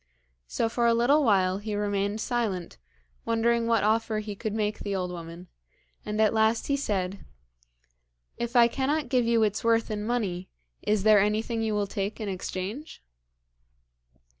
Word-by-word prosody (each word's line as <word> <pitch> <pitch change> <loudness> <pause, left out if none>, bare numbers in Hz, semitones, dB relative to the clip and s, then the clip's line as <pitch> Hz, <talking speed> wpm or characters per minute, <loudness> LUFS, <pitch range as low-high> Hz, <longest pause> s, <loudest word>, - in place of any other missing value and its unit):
So 225 - 0
for 235 +1 +1
a 230 - +4
little 275 +6 +4
while 190 -5 +2
he 210 0 -4
remained 205 +1 -1
silent, 210 - -2 0.4
wondering 230 0 +1
what 230 -3 +2
offer 220 +1 +1
he 215 -1 -4
could 215 +1 -4
make 210 -1 -1
the 200 -1 -3
old 180 -1 -2
woman, 170 +1 -9 0.6
and 210 0 -4
at 220 0 +4
last 220 +1 +2
he 280 - +1
said: 195 -8 -2 1.1
'If 235 +1 -4
I 235 -1 +7
cannot 275 +5 -1
give 250 -3 +2
you 230 -1 +3
its 210 0 0
worth 230 -1 +2
in 210 -1 -3
money, 205 -6 -2 0.3
is 210 -2 0
there 215 -1 +6
anything 220 +3 0
you 220 -1 0
will 205 -1 +1
take 200 +1 -4
in 215 - -4
exchange?' 195 - -5
215 Hz, 165 wpm, -27 LUFS, 200-230 Hz, 1.1 s, I